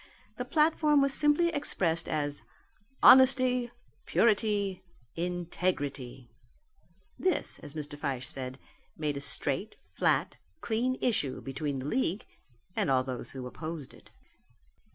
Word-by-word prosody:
The - - -3
platform 305 -1 +3
was 275 -1 +3
simply 300 +4 +3
expressed 185 - +1
as 145 -2 -1 0.6
Honesty, 255 -2 +6 0.4
Purity, 205 -4 +2 0.3
Integrity. 165 -7 -3 0.9
This, 370 - 0
as 145 - -11
Mr. 150 -1 -5
Fyshe 135 -4 -3
said, 130 -1 -5 0.4
made 150 -2 -2
a - - -3
straight, 140 - -1 0.2
flat, - - +1 0.2
clean 245 +3 -1
issue 175 - 0
between 135 +1 -4
the 130 - -5
league 200 - -1 0.5
and 205 -8 0
all 130 -1 +3
who 130 0 -6
opposed 155 +2 -7
it. - - -18
170 Hz, 110 wpm, -30 LUFS, -, 0.9 s, Honesty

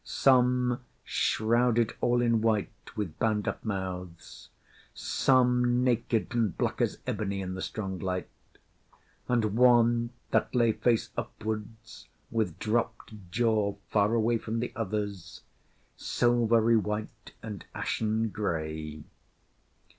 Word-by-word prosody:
Some 125 -1 +3 0.2
shrouded 115 +1 +2
all 120 0 +2
in 115 -2 +2
white 110 -2 +1 0.2
with 100 -7 -4
bound 110 -2 +1
up - - -3
mouths; 90 -5 -6 0.5
some 125 -1 +2
naked 120 -2 0
and 115 -7 0
black - - -1
as - - 0
ebony 100 -2 -2
in 95 -1 -4
the 95 - -5
strong 95 -4 -4
light; 90 -1 -2 1.0
and 115 -4 +1
one 120 -1 +4 0.2
that - - +1
lay 120 -2 +4
face 115 +1 +1
upwards 110 +1 -6 0.2
with 110 -7 -1
dropped 110 -3 -3
jaw, 105 -1 +1 0.2
far 105 +2 +3
away 115 0 +2
from 115 +1 -3
the 120 - -3
others 100 -4 -4 0.5
silvery 115 -1 +3
white 105 0 -4
and 105 -4 -7
ashen 110 0 -1
gray. 80 -6 -4
110 Hz, 115 wpm, -29 LUFS, 100-120 Hz, 1.0 s, one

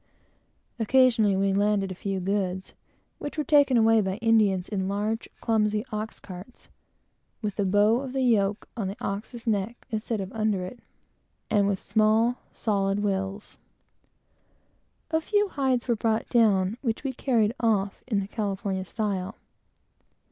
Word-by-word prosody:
Occasionally 230 -3 +4
we 195 0 +1
landed 200 -1 +1
a - - -2
few 195 +1 -3
goods, 190 0 -2 0.5
which 290 - -6
were 305 - +1
taken 285 -5 +4
away 225 -1 +5
by 190 -1 -2
Indians 215 -4 +2
in 190 -3 -2
large, 210 +3 -2
clumsy 215 -1 +1
ox 215 +1 -4
carts, 190 +6 -11 0.7
with 205 -2 -2
the 210 +6 +2
yoke 210 -5 +2
on 210 -5 -2
the 195 - -5
ox's 220 +4 -5
neck 220 +1 -2
instead 220 0 -2
of 190 0 -5
under 215 -4 0
it, 240 +6 -9 0.7
and 205 -2 +3
with 200 -1 +1
small 220 +4 +2
solid 200 -2 0
wheels. 195 0 -3 1.5
A 320 0 +2
few 410 +4 +1
hides 265 -6 0
were 240 - +2
brought 225 0 0
down, 210 -3 +3
which 230 -2 -2
we 270 -2 -2
carried 230 -4 +1
off 205 -4 0
in 210 -5 +1
the 195 - -5
California 200 -3 -3
style. 195 -1 -3
210 Hz, 140 wpm, -26 LUFS, 195-230 Hz, 1.5 s, away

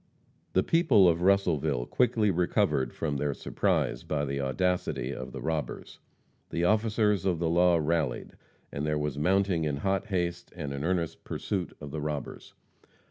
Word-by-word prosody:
The - - +3
people 165 - +5
of 85 0 +2
Russellville 80 -9 +2
quickly 110 - +2
recovered 85 -6 +1
from 75 -3 -2
their 70 0 -1
surprise - - 0
by 75 -1 -2
the 70 0 -2
audacity 90 +7 -1
of 65 0 -7
the - - -7
robbers. 80 -2 -4 0.5
The 85 - -2
officers 105 0 +2
of 95 -3 +1
the 85 0 -1
law 85 +1 +4
rallied, 80 -4 -1 0.4
and 70 - -4
there 75 0 0
was 75 -1 -2
mounting 95 0 +2
in 75 -2 -1
hot 95 +7 -1
haste 85 -3 -2
and 75 -5 -4
an 70 0 -4
earnest 85 -1 -1
pursuit 95 -4 -3
of 75 -2 -8
the 75 0 -4
robbers. 75 -3 -5
85 Hz, 160 wpm, -28 LUFS, 75-95 Hz, 0.5 s, people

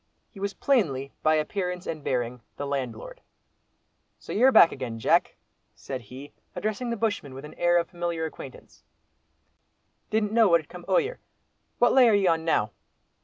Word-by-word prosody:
He 200 - -13
was 200 0 -3
plainly, 140 - 0
by 155 0 +3
appearance 180 +3 -2
and 155 -3 -5
bearing, 125 -1 -2 0.2
the 145 - -4
landlord. 140 - -5 1.0
"So - - -8
you're 255 +5 +5
back 170 - +7
again, 120 -3 -5
Jack," 110 - +2 0.4
said 130 -2 -6
he, 130 +6 -11 0.2
addressing 215 +3 -3
the 235 - -2
bushman 205 -12 -2
with 135 +2 -8
an 150 - -11
air 175 0 +2
of 170 -1 0
familiar 170 -2 -3
acquaintance; 140 -4 -11 1.3
"didn't 215 -1 0
know 225 -1 +5
what 170 -2 +5
had 150 - -23
come 175 0 -11
o'yer. - - +1 0.6
What 245 - +4
lay 255 -3 +6
are 215 - +4
ye 200 -1 +2
on 165 -2 +2
now?" 110 -10 +1
170 Hz, 170 wpm, -26 LUFS, 140-215 Hz, 1.3 s, back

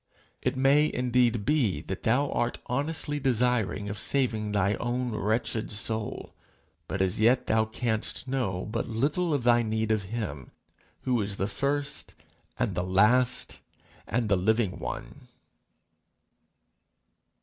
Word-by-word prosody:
It 130 +1 -1
may 140 +3 +4
indeed 125 -3 +1
be 130 - +2
that 95 - -5
thou 135 +5 +2
art 120 - 0
honestly 145 +3 -2
desirous 125 -6 +1
of 100 0 -4
saving 110 -7 0
thy 100 -1 +2
own 120 +1 -1
wretched 110 +1 -1
soul, 110 +1 -3 0.5
but 95 0 0
as 95 +3 -1
yet 120 +3 +4
thou 110 0 +2
canst 110 +2 -2
know 120 -9 -1
but 115 0 -2
little 150 +10 0
of 140 -4 0
thy 120 0 +5
need 110 -1 -1
of 110 -1 +2
him 100 - -4 0.5
who 125 -3 +1
is 100 -1 -3
the 95 - 0
first 140 +6 -2 0.4
and - - 0
the 90 - -1
last 105 +7 +2 0.5
and 115 -2 0
the 100 - +3
living 110 +1 +1
one. - - -7
115 Hz, 135 wpm, -28 LUFS, 105-125 Hz, 0.5 s, thy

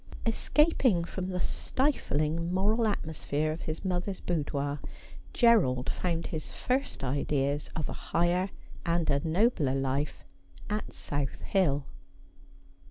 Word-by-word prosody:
Escaping 250 - +3
from 185 +2 -4
the 180 -1 -2
stifling 170 - 0
moral 215 +5 +2
atmosphere 155 -5 -1
of 155 - -5
his 155 +4 -4
mother's 185 +1 -1
boudoir, 145 -3 -1 0.5
Gerald 180 - +4
found 170 -2 -1
his 155 -2 -4
first 260 - -1
ideas 140 +1 0
of 155 -3 -1
a - - -4 0.2
higher 175 +3 +2 0.3
and 170 -1 +1
a 140 - +3
nobler 165 - +2
life 135 +2 -1 0.5
at 210 +1 -2
South 145 -2 -3
Hill. 145 -8 +2
170 Hz, 115 wpm, -30 LUFS, 145-195 Hz, 0.5 s, Gerald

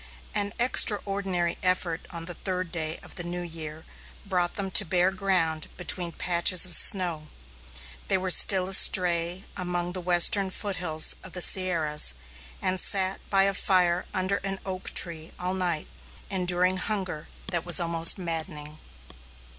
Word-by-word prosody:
An 205 0 -1
extraordinary 195 -7 +2
effort 185 -3 -3
on 170 -2 -8
the 175 - -4
third 185 -1 -5
day 160 -1 -2
of - - -12
the 175 - -7
new 175 +1 -6
year 160 -2 -9 0.4
brought 180 -3 -3
them 195 -2 -5
to - - +4
bare 180 +2 0
ground 180 -5 -2
between 180 -1 -3
patches 175 +2 +2
of 180 - -4
snow. 170 -6 +4 0.8
They - - 0
were 185 0 -2
still 185 0 +5
astray 180 -1 +5
among 175 -1 -5
the 185 - -6
western 180 +3 +3
foothills 180 -6 0
of 190 - -14
the 180 - -5
Sierras, 160 - +3 0.5
and 185 0 -2
sat 190 -1 0
by 195 -1 +2
a 195 0 0
fire 180 -2 -1
under 190 0 -2
an 195 0 -5
oak 190 -1 -6
tree 165 -2 +1
all 180 +1 -4
night, 175 -4 -4 0.4
enduring 180 0 -1
hunger 185 -6 -5 0.2
that 170 -2 -3
was 175 +1 +5
almost 165 0 +3
maddening. 155 -4 -7
180 Hz, 145 wpm, -25 LUFS, 170-190 Hz, 0.8 s, still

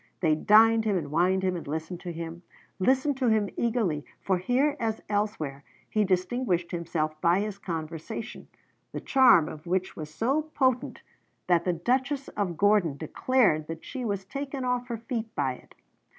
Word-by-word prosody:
They 160 -4 +3
dined 220 +7 +5
him 210 -3 +1
and 145 -5 -4
wined 185 +4 +2
him 185 -1 +1
and 170 - -6
listened 160 +4 -4
to 175 - -6
him, 165 0 -6 0.4
listened 260 +7 +2
to 260 -2 +1
him 215 -3 +2
eagerly, 220 -11 0 0.2
for 190 -2 0
here 260 +9 +1
as 225 -1 -2
elsewhere 205 -10 -2 0.3
he 215 - +2
distinguished 185 -1 0
himself 160 -3 -2
by 175 +3 +3
his 205 -1 -4
conversation, 170 +6 -6 0.5
the - - -3
charm 255 - +5
of 155 +2 -9
which 185 +2 -1
was 155 -1 -7
so 250 - +1
potent 260 -5 -1 0.4
that 175 -1 +2
the 180 - +2
Duchess 265 - -1
of 180 -5 -3
Gordon 200 -8 +3
declared 155 - +1
that 165 0 -7
she 260 -2 -5
was 200 -4 -2
taken 275 +4 -4
off 250 0 -1
her 235 -2 -3
feet 230 -1 -5
by 135 -3 0
it. - - -16
195 Hz, 170 wpm, -27 LUFS, 165-240 Hz, 0.5 s, dined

